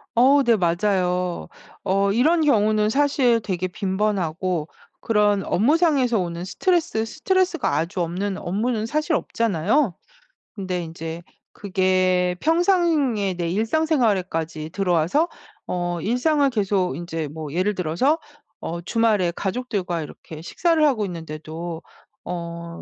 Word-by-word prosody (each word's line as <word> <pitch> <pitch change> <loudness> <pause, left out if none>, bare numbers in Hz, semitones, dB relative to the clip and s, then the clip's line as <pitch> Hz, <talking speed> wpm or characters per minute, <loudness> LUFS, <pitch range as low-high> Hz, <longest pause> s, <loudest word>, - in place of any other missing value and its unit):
어 270 +4 +5
네 235 -2 +4
맞아요. 180 -1 0 0.4
어 195 +1 +2
이런 310 +10 +3
경우는 215 -6 +3
사실 270 -3 +3
되게 185 -3 -2
빈번하고 185 -4 -1 0.3
그런 210 -3 +2
업무상에서 270 - +2
오는 170 -1 -3
스트레스 325 - 0
스트레스가 360 +6 0
아주 175 +3 -1
없는 185 +4 -2
업무는 215 +4 -1
사실 305 +6 -1
없잖아요. 220 - 0 0.6
근데 185 -4 -3
인제 165 +1 -7 0.3
그게 185 -2 +1
평상의 320 - +2
내 170 -1 -2
일상생활에까지 195 - 0
들어와서 180 - +1 0.4
어 175 -1 -2
일상을 275 - +2
계속 195 - 0
인제 165 -2 -4
뭐 155 0 -7
예를 185 +5 +1
들어서 185 - +1 0.4
어 170 +1 -4
주말에 210 -3 +1
가족들과 195 -5 -2
이렇게 155 +1 -10
식사를 325 - +1
하고 235 -8 +2
있는데도 165 0 -6 0.4
어 170 -1 -6
195 Hz, 280 characters per minute, -23 LUFS, 175-245 Hz, 0.6 s, 어